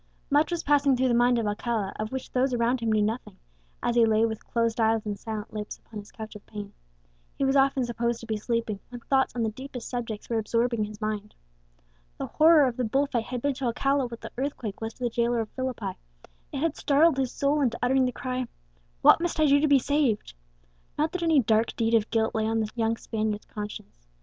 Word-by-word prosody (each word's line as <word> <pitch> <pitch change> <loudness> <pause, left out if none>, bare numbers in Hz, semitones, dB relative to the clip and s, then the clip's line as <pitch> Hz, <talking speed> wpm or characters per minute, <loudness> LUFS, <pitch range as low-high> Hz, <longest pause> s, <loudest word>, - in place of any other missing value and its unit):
Much 295 +3 +4
was 345 -2 -2
passing 285 -2 +3
through 260 +1 +2
the 245 - +2
mind 240 +1 +4
of 230 - 0
Alcala 210 0 -2
of 215 0 -3
which 265 -1 -5
those 255 0 +1
around 240 +2 +1
him 230 -1 0
knew 215 -1 +3
nothing, 225 +4 -3 0.5
as 240 - +1
he 235 - +6
lay 220 0 +4
with 220 -1 -4
closed 230 0 0
eyes 220 0 +2
and 205 -2 -4
silent 215 -1 -6
lips 210 -1 -5
upon 215 - -10
his 205 0 -12
couch 220 -1 -8
of 210 - -10
pain. 205 -1 -7 0.6
He 275 - +1
was 270 +1 +2
often 270 -1 +3
supposed 235 0 -1
to - - -8
be 220 -1 -2
sleeping, 220 -1 -2
when 245 -1 -9
thoughts 265 +1 +1
on 235 - 0
the 220 - 0
deepest 255 +1 -8
subjects 230 -4 -5
were 230 -1 0
absorbing 230 0 0
his 210 0 -10
mind. 215 -1 -4 0.8
The - - -3
horror 315 -1 +5
of 250 -2 -2
the 250 - 0
bull 270 +5 +2
fight 240 -5 -2
had 245 -1 -5
been 285 0 +2
to 265 0 -4
Alcala 275 +3 +1
what 235 -1 -9
the - - -8
earthquake 255 -7 -4
was 225 0 -4
to 250 - -9
the 240 - +1
jailer 235 +1 +1
of 220 -2 -2
Philippi; 250 -7 -4 0.5
it - - -4
had 320 +2 0
startled 295 +1 +3
his 260 -2 0
soul 285 +1 +1
into 240 -4 +1
uttering 260 +1 +3
the 250 - 0
cry, 255 0 -3 0.6
"What - - +7
must 345 -2 -2
I 310 - +5
do 285 -1 +5
to 305 - +2
be 285 -1 +6
saved?" 270 - 0 0.6
Not 305 +1 +1
that 365 - -3
any 325 -4 +4
dark 220 -1 +1
deed 225 0 0
of 220 -1 +3
guilt 225 -1 +1
lay 220 -1 0
on 225 0 +1
the 215 -1 -2
young 230 -1 0
Spaniard's 215 -2 -3
conscience. 205 - -8
235 Hz, 235 wpm, -27 LUFS, 220-265 Hz, 0.8 s, What